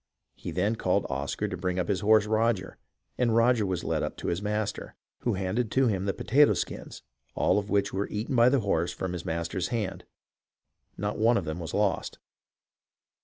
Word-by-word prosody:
He - - -8
then 105 +5 0
called - - +1
Oscar 70 +10 -2
to 95 - -4
bring 90 0 -2
up 90 -2 0
his 100 -3 0
horse 110 +1 +4
Roger, 110 -3 0 0.4
and 120 -3 +2
Roger 115 -2 +3
was 90 -2 -2
led - - -1
up - - -3
to - - -3
his 85 +3 -1
master, 105 0 -3 0.2
who 120 -4 0
handed 100 +5 -1
to 135 0 +4
him 100 -5 0
the 100 - +1
potato 145 +4 +4
skins, - - -5 0.3
all - - +3
of 100 0 -7
which 100 0 +1
were 100 +2 -2
eaten 110 +6 -3
by 120 +1 +6
the 135 -1 +2
horse 85 -4 0
from 90 +1 -4
his 85 -1 -5
master's 85 +2 -2
hand 115 -5 -3 0.5
— - - -48
not 105 +1 -3
one 115 +2 +4
of - - -2
them 80 +2 -4
was 80 -2 -5
lost. 105 -1 0
105 Hz, 200 wpm, -28 LUFS, 90-115 Hz, 0.5 s, by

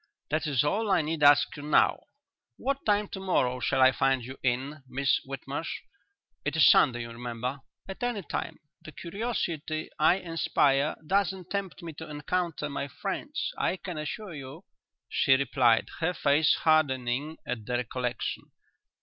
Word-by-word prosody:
"That 155 +1 0
is 140 -4 +2
all 205 +9 0
I 190 -5 +3
need 155 0 -3
ask 145 0 +6
you 145 - -8
now. 150 +1 +3 0.5
What 275 +2 -2
time 205 0 +3
to 190 - -6
morrow 130 -10 +1
shall 130 - +1
I 130 - +7
find 135 -1 +1
you 130 +2 -7
in, 135 +4 -1
Miss 135 +1 +1
Whitmarsh? 135 +3 -5 0.6
It 150 0 -2
is 160 - +6
Sunday, 120 -4 +4
you 115 0 -6
remember." 120 +3 -4 0.3
"At 195 - -8
any 240 -5 -1
time. - - -4 0.3
The 155 - -10
curiosity 170 -6 -3
I 155 +3 +5
inspire 155 -6 +1
doesn't 190 0 0
tempt 200 -3 -4
me 165 -1 -6
to 160 - -8
encounter 150 +1 -2
my 140 0 -4
friends, 135 - -4
I 190 - +1
can 180 -4 -6
assure 200 +5 -5
you," 140 +5 -9 0.4
she 135 - +3
replied, 125 -3 +3
her 175 +2 0
face 145 +2 +3
hardening 145 -1 +1
at 110 -3 -4
the 125 - -1
recollection. 125 0 -3
150 Hz, 160 wpm, -28 LUFS, 130-175 Hz, 0.6 s, I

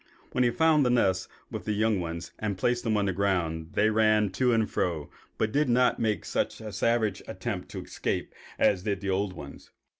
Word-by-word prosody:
When 125 - +2
he 120 - +4
found 155 +3 +4
the 125 - +2
nest 95 -7 +2 0.2
with - - -5
the 105 - 0
young 110 -1 +2
ones 85 -1 -5
and 105 -3 -2
placed 120 +4 +1
them 110 -3 +1
on 100 - +1
the 95 - 0
ground, 85 -4 -1
they 110 +1 +3
ran 110 -2 +3
to 125 +5 +2
and 110 -2 +2
fro, 80 -5 -2 0.3
but 110 - 0
did 145 +1 +2
not 125 +1 +3
make 110 -5 0
such - - -1 0.2
savage 110 0 +1
attempts - - -4
to - - -5
escape - - -3 0.2
as 95 -3 +3
did 100 -1 -2
the 100 -1 -1
old 95 0 0
ones. 70 -4 -10
105 Hz, 205 wpm, -28 LUFS, 95-115 Hz, 0.3 s, he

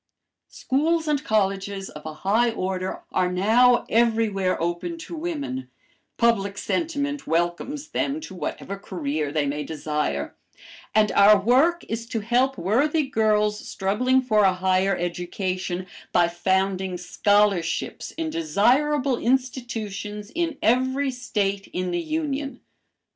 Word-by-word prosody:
Schools 315 +4 0
and 300 -1 +1
colleges 195 -2 0
of 150 - -10
a 155 - -5
high 230 +5 +3
order 190 -3 -3
are 180 -1 +1
now 230 +7 +4
everywhere 220 -5 +2
open 175 - -2
to 330 - -8
women, 285 -6 -4 0.5
public 200 -4 +2
sentiment 290 -2 -2
welcomes 175 - -1
them 280 +3 -1
to 250 - -9
whatever 195 +2 -5
career 155 -6 -3
they 150 -1 0
may 145 +1 -2
desire, 150 - -2 0.6
and 215 -1 +4
our 205 +1 +7
work 270 - +3
is 230 +1 -4
to 225 -1 -3
help 250 +5 +1
worthy 285 - +2
girls 215 -5 +1
struggling 250 +9 +1
for 215 -4 +3
a 190 -1 +5
higher 185 +1 +1
education, 180 +1 -3 0.3
by 175 -1 +4
founding 190 +1 0
scholarships 195 -1 +1
in 325 -1 -2
desirable 285 -2 +2
institutions 225 -5 -2
in 330 -3 -1
every 260 +3 +2
State 200 -6 -2
in 180 0 -2
the 175 0 -1
Union. 290 - -3
210 Hz, 125 wpm, -24 LUFS, 185-265 Hz, 0.6 s, our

